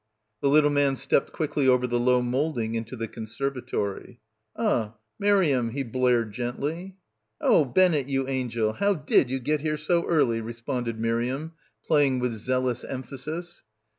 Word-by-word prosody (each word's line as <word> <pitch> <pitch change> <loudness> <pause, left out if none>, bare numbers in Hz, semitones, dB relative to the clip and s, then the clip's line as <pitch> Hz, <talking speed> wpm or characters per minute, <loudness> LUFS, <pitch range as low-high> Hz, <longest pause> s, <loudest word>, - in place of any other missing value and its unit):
The 140 - +2
little 150 +1 +5
man 145 -1 +2
stepped 135 - +1
quickly 145 -3 -1
over 125 -1 +4
the 120 -1 0
low 125 0 +3
moulding 125 -2 -1
into 115 +2 -4
the 115 -1 -4
conservatory. 120 -2 -4 0.4
"Ah, 120 - 0 0.2
Mariamne," 155 - +2
he 140 +1 -2
blared 120 -2 +1
gently. 145 - -4 0.4
"Oh, 155 - +4
Bennett, 150 -1 +2
you 135 -1 0
angel, 120 -5 -1
how 200 - +1
did 145 -5 +2
you 135 - -1
get 150 +4 -1
here 155 0 -1
so 170 +3 +1
early?" 120 -9 +2
responded 115 0 -4
Miriam, 120 +7 -1 0.3
playing 145 -4 +3
with 125 -1 -1
zealous 125 +2 -1
emphasis. 150 +7 -6
130 Hz, 145 wpm, -26 LUFS, 120-150 Hz, 0.4 s, little